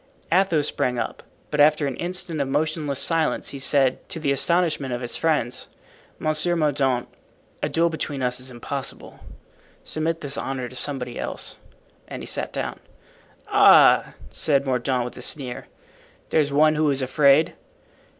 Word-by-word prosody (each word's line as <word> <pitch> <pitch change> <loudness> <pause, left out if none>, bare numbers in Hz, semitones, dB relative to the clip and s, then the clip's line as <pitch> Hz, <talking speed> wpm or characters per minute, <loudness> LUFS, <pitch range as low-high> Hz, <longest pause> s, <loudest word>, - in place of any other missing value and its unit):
Athos 170 -5 +3
sprang 125 -1 -1
up, - - -4 0.3
but 150 - -2
after 150 0 +5
an 135 -3 -2
instant 175 -3 -2
of 140 - -1
motionless 150 0 -1
silence 165 +1 +1
he 140 - -5
said, 135 -1 +2
to 165 - -6
the 145 -3 0
astonishment 155 -1 +1
of 120 0 -3
his 120 - -2
friends, 150 -7 0 0.5
"Monsieur 155 +3 +1
Mordaunt, 135 -6 +1 0.5
a - - -1
duel 165 +1 +2
between 145 -4 -4
us 125 0 0
is 130 +1 -4
impossible. 130 +2 -6 0.6
Submit 165 +1 -2
this 140 -1 -1
honour 130 -2 -3
to 130 - -11
somebody 125 -2 -3
else." - - -4 0.5
And - - -7
he - - -6
sat - - -2
down. - - -4 0.7
"Ah!" - - +6 0.2
said 140 -2 +1
Mordaunt, 125 -1 0
with 125 - -8
a - - -8
sneer, 130 -5 -4 0.6
"there's 150 -3 +2
one 155 +2 +4
who 155 -1 +1
is 135 -1 0
afraid." 140 +3 +4
140 Hz, 155 wpm, -23 LUFS, 130-155 Hz, 0.7 s, Ah